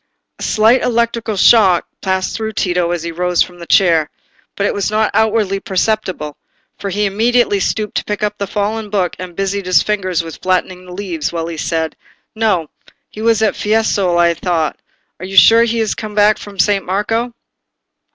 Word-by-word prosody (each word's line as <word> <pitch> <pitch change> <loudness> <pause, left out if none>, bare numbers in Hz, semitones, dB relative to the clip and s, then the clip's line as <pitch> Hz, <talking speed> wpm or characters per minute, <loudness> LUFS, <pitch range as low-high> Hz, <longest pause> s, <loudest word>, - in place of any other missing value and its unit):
A - - -13
slight 225 +4 +3
electric 235 -1 0
shock 190 -4 +5 0.2
passed 190 -1 -1
through 220 -1 -4
Tito 180 -3 0
as 175 -2 -2
he 170 - -4
rose 180 +1 +1
from 175 -1 -13
the 170 - -9
chair, 165 -5 +3 0.5
but 200 - -1
it - - 0
was 200 0 -1
not 215 0 +1
outwardly 215 -2 +1
perceptible, 190 -6 -2 0.4
for 200 - -4
he 205 +2 0
immediately 220 +1 +2
stooped 210 +2 -2
to - - -1
pick 210 0 -4
up 210 0 -2
the 200 - -2
fallen 210 +2 -2
book, 190 -4 -1
and 180 -1 -8
busied 195 0 -2
his 185 - +4
fingers 185 -5 -1
with 165 -2 -9
flattening 185 0 -1
the - - -10
leaves, 180 -5 -4
while 165 -1 -3
he 165 -1 -6
said— 160 0 -2 0.4
"No; 210 -8 0 0.4
he 215 - -8
was 225 -1 +2
at 215 - +2
Fiesole, 210 -4 +1
I 170 0 +4
thought. 165 -3 -2 0.4
Are 185 - -6
you 195 0 -5
sure 230 +4 +7
he 230 0 -1
is 220 -2 0
come 215 -1 -7
back 210 0 +4
to 205 -1 -11
San 200 +1 +2
Marco?" 225 +5 -2
200 Hz, 190 wpm, -16 LUFS, 180-215 Hz, 0.5 s, sure